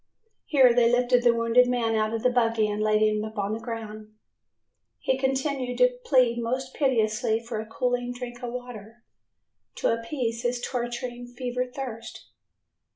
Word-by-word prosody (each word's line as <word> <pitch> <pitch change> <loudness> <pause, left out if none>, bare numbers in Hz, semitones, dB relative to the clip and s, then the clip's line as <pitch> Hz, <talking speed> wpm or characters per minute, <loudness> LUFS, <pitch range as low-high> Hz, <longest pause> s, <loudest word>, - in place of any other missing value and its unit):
Here 260 -5 +5
they 235 -1 +4
lifted 245 0 +3
the 240 -1 +5
wounded 230 +2 +4
man 240 -2 0
out 215 0 +1
of 225 0 -3
the 250 - +4
buggy 230 -3 +2
and 210 0 -2
laid 215 0 +3
him 215 0 +1
upon 215 -1 -3
the 220 - -3
ground. 215 -2 -7 0.9
He 260 - 0
continued 265 -1 -1
to - - +4
plead 255 - +3
most 255 +3 -3
piteously 225 -4 +1
for 230 -1 -5
a 220 - -6
cooling 245 +1 -1
drink 245 0 -7
of 245 -1 -4
water 240 -2 -9 0.7
to - - 0
appease 230 0 -3
his 240 0 -1
torturing 245 0 -4
fever 250 +1 -3
thirst. 245 -3 -8
240 Hz, 155 wpm, -26 LUFS, 225-250 Hz, 0.9 s, Here